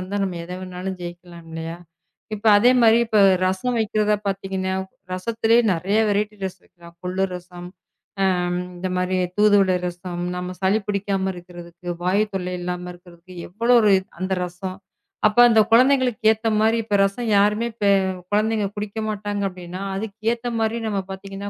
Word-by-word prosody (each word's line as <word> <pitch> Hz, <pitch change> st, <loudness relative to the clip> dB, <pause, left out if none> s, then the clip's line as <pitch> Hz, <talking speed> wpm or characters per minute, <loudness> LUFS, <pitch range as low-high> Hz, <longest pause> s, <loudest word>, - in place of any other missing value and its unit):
இருந்தா 200 Hz, +2 st, -3 dB
நாம 180 Hz, -3 st, -4 dB
எதை 180 Hz, +1 st, -7 dB
வேணாலும் 185 Hz, 0 st, -6 dB
ஜெயிக்கலாம் 175 Hz, -1 st, -10 dB
இல்லையா? 165 Hz, +1 st, -5 dB, 0.6 s
இப்ப 215 Hz, +2 st, -6 dB
அதே 245 Hz, +4 st, +5 dB
மாதிரி 230 Hz, 0 st, +6 dB
இப்ப 215 Hz, -2 st, +3 dB, 0.3 s
ரசம் 210 Hz, +7 st, -1 dB
வைக்கிறத 210 Hz, -1 st, +1 dB
பாத்தீங்கன்னா 190 Hz, -1 st, -2 dB, 0.4 s
ரசத்திலேயே 230 Hz, +4 st, +2 dB
நிறைய 195 Hz, +6 st, 0 dB
வெரைட்டி 210 Hz, +1 st, -1 dB
ரசம் 190 Hz, -1 st, -6 dB
வைக்கலாம். 170 Hz, -1 st, -17 dB
கொள்ளு 185 Hz, +1 st, 0 dB
ரசம் 175 Hz, 0 st, -9 dB, 1.1 s
இந்த 185 Hz, +1 st, -3 dB
மாதிரி 180 Hz, +1 st, 0 dB, 0.2 s
தூதுவளை 200 Hz, -3 st, +4 dB
ரசம். 175 Hz, 0 st, -6 dB
நம்ம 180 Hz, 0 st, -4 dB
சளி 195 Hz, +3 st, +2 dB
பிடிக்காம 195 Hz, -1 st, -1 dB
இருக்கறதுக்கு, 175 Hz, 0 st, -10 dB
வாயுத் 200 Hz, +3 st, +1 dB
தொல்லை 180 Hz, -1 st, -3 dB
இல்லாம 180 Hz, 0 st, -4 dB
இருக்கறதுக்கு 175 Hz, +1 st, -16 dB
எவ்வளவு 235 Hz, +5 st, +3 dB
ஒரு 210 Hz, -, +4 dB, 0.3 s
அந்த 190 Hz, 0 st, -1 dB
ரசம். 185 Hz, +2 st, -7 dB, 0.5 s
அப்ப 215 Hz, +3 st, 0 dB
அந்த 220 Hz, -1 st, +5 dB
குழந்தைகளுக்கு 255 Hz, -1 st, +4 dB
ஏத்த 220 Hz, +1 st, -2 dB
மாதிரி 225 Hz, +1 st, +3 dB
இப்ப 210 Hz, -2 st, -1 dB
ரசம் 200 Hz, +4 st, -1 dB
யாருமே 210 Hz, +3 st, +2 dB, 0.6 s
குழந்தைங்க 215 Hz, 0 st, +1 dB
குடிக்க 210 Hz, +1 st, -5 dB
மாட்டாங்க 205 Hz, -1 st, -3 dB
அப்படின்னா 180 Hz, +1 st, -8 dB
அதுக்கு 205 Hz, 0 st, -5 dB, 0.2 s
ஏத்த 240 Hz, +1 st, -6 dB
மாதிரி 225 Hz, +1 st, 0 dB
நாம 200 Hz, -2 st, -1 dB
பாத்தீங்கன்னா 195 Hz, +1 st, -7 dB
195 Hz, 150 wpm, -22 LUFS, 180-215 Hz, 1.1 s, மாதிரி